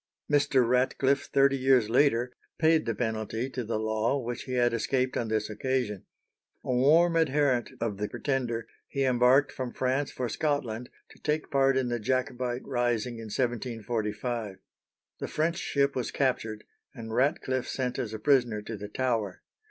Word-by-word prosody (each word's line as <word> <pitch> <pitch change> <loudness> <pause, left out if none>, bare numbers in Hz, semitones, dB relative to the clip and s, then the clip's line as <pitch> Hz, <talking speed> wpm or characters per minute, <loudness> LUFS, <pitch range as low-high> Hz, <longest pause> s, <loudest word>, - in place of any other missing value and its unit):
Mr. 135 -4 +3
Ratcliffe, 130 +2 +2
thirty 135 0 +4
years 130 -4 +4
later, 125 0 +2 0.2
paid 160 0 +3
the 115 - 0
penalty 110 +2 -2
to 125 -1 -3
the 110 0 -2
law 110 +4 0
which 120 -2 -5
he 130 - -5
had 120 -1 +2
escaped 130 +3 0
on 115 - -1
this 110 -1 0
occasion. 110 -2 -2 0.6
A 125 - -1
warm 160 +7 +4
adherent 145 -5 +2
of 115 -4 -2
the 105 +1 -3
Pretender, 120 -5 -2 0.2
he 140 - -1
embarked 130 +2 +4
from 130 -2 -4
France 130 +3 -1
for 125 - -3
Scotland 125 -3 -2 0.2
to - - -18
take 150 0 -2
part 135 -1 +3
in 130 -2 0
the 120 0 -1
Jacobite 125 +1 -1
rising 120 -1 -1
in 115 - -7
1745. 115 -2 -2 0.6
The - - -3
French 165 +2 0
ship 140 0 +1
was 125 -2 -2
captured, 115 -5 -1 0.3
and 115 -3 -7
Ratcliffe 130 -1 +1
sent 125 -2 -2
as 115 - -3
a 110 - -4
prisoner 120 -3 +2
to 115 - -5
the 105 0 -7
Tower. 115 -6 -1
125 Hz, 160 wpm, -28 LUFS, 115-135 Hz, 0.6 s, thirty